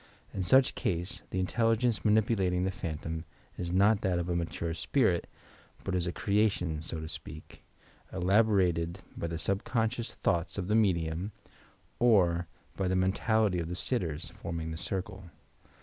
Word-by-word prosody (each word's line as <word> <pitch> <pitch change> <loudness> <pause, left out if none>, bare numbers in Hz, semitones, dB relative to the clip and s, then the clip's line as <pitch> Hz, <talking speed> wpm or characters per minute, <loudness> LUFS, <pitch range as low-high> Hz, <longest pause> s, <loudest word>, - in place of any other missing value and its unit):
In 95 - -2
such 130 +9 +5
case, 90 +2 -2
the 95 - -2
intelligtnee 115 +4 +1
manipulating 105 -4 +2
the 95 - 0
phantom 80 -2 -4 0.3
is 85 -1 -4
not 100 +3 +4
that 95 -3 +1
of 85 0 -2
a 85 - 0
mature 85 -1 -2
spirit 90 - +1 0.5
but 95 - -3
is 90 -1 +1
a - - 0
creation, 100 -6 +1
so 80 0 -4
to 80 - -5
speak, 80 -1 -8 0.5
elaborated 90 -3 +2
by 85 - -3
the 85 - -4
subcon 110 +6 0
scious 120 -1 -5
thoughts 85 +2 -1
of 95 -3 -2
the 105 - +3
medium 90 -2 +1 0.7
or 90 -8 +4 0.3
by 95 - -1
the 95 - +1
mentality 95 +1 +2
of 85 -1 -3
the 90 - -3
sitters, 90 - -2
forming 80 -1 -5
the - - -4
circle. 95 +1 -4
90 Hz, 155 wpm, -30 LUFS, 85-105 Hz, 0.7 s, such